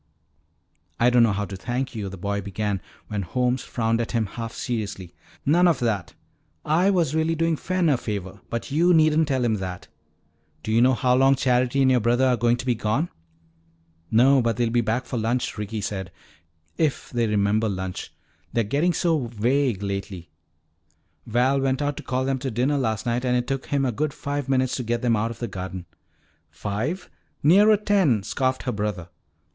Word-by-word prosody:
"I 120 +1 +4
don't 120 -1 +5
know 115 -2 +4
how 100 +1 -1
to 100 - -7
thank 125 +7 -3
you," 105 -4 -4
the 95 - -8
boy 100 +2 -2
began 100 -1 -3 0.3
when 105 -2 -3
Holmes 125 +7 0
frowned 115 -1 0
at 115 - -4
him 115 -2 +1
half 115 +3 -6
seriously. 100 -8 -4 0.3
"None 175 +5 +4
of 165 -5 +3
that. 105 -7 -1 0.5
I 170 +6 +3
was 170 -7 +1
really 160 +1 +1
doing 165 0 +1
Fen 185 +2 0
a 145 -4 +3
favor, 100 -4 -5
but 115 +4 -4
you 170 +4 +4
needn't 155 0 +4
tell 130 -4 0
him 110 -2 +1
that. 90 -2 -6 0.7
Do 110 - -3
you 115 +1 +4
know 130 +1 +5
how 125 0 +2
long 135 +2 +5
Charity 130 +1 +2
and 130 - +4
your 125 - +4
brother 120 +3 +2
are 130 -1 +3
going 120 0 +2
to 130 - -6
be 125 - +2
gone?" 120 +9 -1 1.0
"No. 130 +4 +5
But 115 -1 0
they'll 120 -2 +1
be 120 0 +3
back 115 +3 -1
for 125 - -3
lunch," 120 +3 -1
Ricky 105 0 -4
said. 95 -2 -4 0.7
"If 155 -4 0
they 120 -2 +1
remember 105 +1 +1
lunch 95 -2 -5 0.4
they're 115 - +2
getting 145 - +1
so 160 -6 +1
vague 120 -1 0
lately. 100 -3 -5 1.0
Val 125 +4 +2
went 135 0 0
out 145 -1 -1
to - - -5
call 130 0 -2
them 135 0 0
to 135 +1 -3
dinner 130 +5 0
last 110 -5 -1
night 120 +1 0
and 125 -1 +2
it 125 - -1
took 135 0 -3
him 140 -1 +1
a 125 - +1
good 145 +5 -2
five 140 -1 -4
minutes 130 -1 +1
to 125 - -3
get 120 +1 -2
them 120 -2 +3
out 110 +2 0
of 115 - -7
the 120 - -4
garden." 95 -2 -6 0.6
"Five? 125 - -3 0.4
Nearer 205 +8 +6
ten," 190 - +2
scoffed 130 +4 -1
her 125 - -1
brother. 105 -5 -3
120 Hz, 195 wpm, -24 LUFS, 105-135 Hz, 1.0 s, Nearer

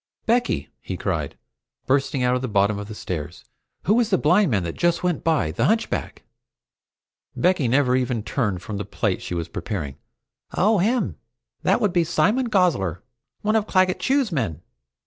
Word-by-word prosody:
"Becky!" 225 - +1
he - - -6
cried, - - -2 0.5
bursting 135 -1 +1
out 125 0 +3
at 125 - 0
the 130 - -2
bottom 100 -1 +2
of 105 - -6
the 110 - -8
stairs, 80 -7 -6 0.4
"Who 215 +5 +3
is 230 -3 +1
the 190 - +3
blind 180 +5 +3
man 100 -7 +1
that 85 -1 -3
just 175 0 +1
went 175 -4 0
by 155 - +1
the 115 - 0
hunchback?" 225 +5 -1 1.1
Becky 180 -7 +2
never 130 +1 +3
even 125 -4 0
turned 105 -6 -1
from 105 - -5
the 105 - -3
plate 105 -1 -2
she 90 - -4
was 85 -1 -3
preparing. 75 -9 -5 0.6
"Oh, 210 +2 +3
him? 235 +7 +1 0.4
That - - +2
would 205 -5 +1
be 175 - +3
Simon 215 +9 +1
Gosler, 150 - +1 0.4
one 215 +1 +2
of 215 -1 +1
Claggett 185 -1 +2
Chew's 270 -5 +1
men. 105 - -2
135 Hz, 175 wpm, -23 LUFS, -, 1.1 s, out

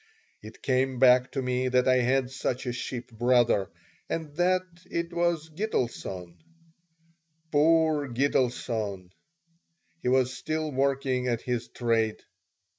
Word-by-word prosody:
It - - -13
came 130 0 +1
back 125 0 +5
to 135 - -2
me 125 0 0
that 125 0 +2
I 130 0 +5
had 130 +1 +1
such 130 -1 -3
a 125 - -2
ship 120 0 -5
brother, 120 -3 +2 0.4
and 155 -3 -4
that 185 +2 +2 0.3
it 170 0 -3
was 170 -2 0
Gitelson. 120 - -3 1.1
Poor 155 -1 +3
Gitelson! 120 -7 -1 0.9
He - - -3
was 130 0 +3
still 155 +2 -3
working 135 -1 0
at 120 -2 0
his 120 -2 -2
trade. 115 -2 0
130 Hz, 120 wpm, -27 LUFS, 120-145 Hz, 1.1 s, back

